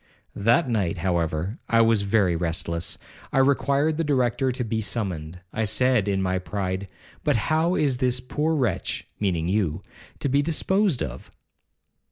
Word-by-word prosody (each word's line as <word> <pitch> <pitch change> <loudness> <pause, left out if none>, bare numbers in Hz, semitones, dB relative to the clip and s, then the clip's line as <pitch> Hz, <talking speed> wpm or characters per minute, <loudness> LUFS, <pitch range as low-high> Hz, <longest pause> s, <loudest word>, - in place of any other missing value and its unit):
That 120 +10 +3
night, 100 -8 0
however, 85 - -1
I 115 0 +5
was 115 -2 +4
very 100 -3 +2
restless. 85 0 -2 0.3
I - - -1
required 140 +3 +3
the 165 - +1
Director 130 -2 +1
to 125 0 -3
be 110 -1 -2
summoned. 90 -7 -3
I 110 - 0
said 110 0 +2
in 95 -1 +1
my 95 0 0
pride, 95 0 -3 0.4
'But - - +2
how 160 - +1
is 135 -4 +1
this 125 -1 +2
poor 150 +5 -1
wretch 120 - -1
(meaning 85 -5 0
you) 95 -5 0 0.3
to - - -2
be 140 +2 +3
disposed 170 - +1
of?' 65 -1 -7
110 Hz, 155 wpm, -25 LUFS, 90-135 Hz, 0.4 s, I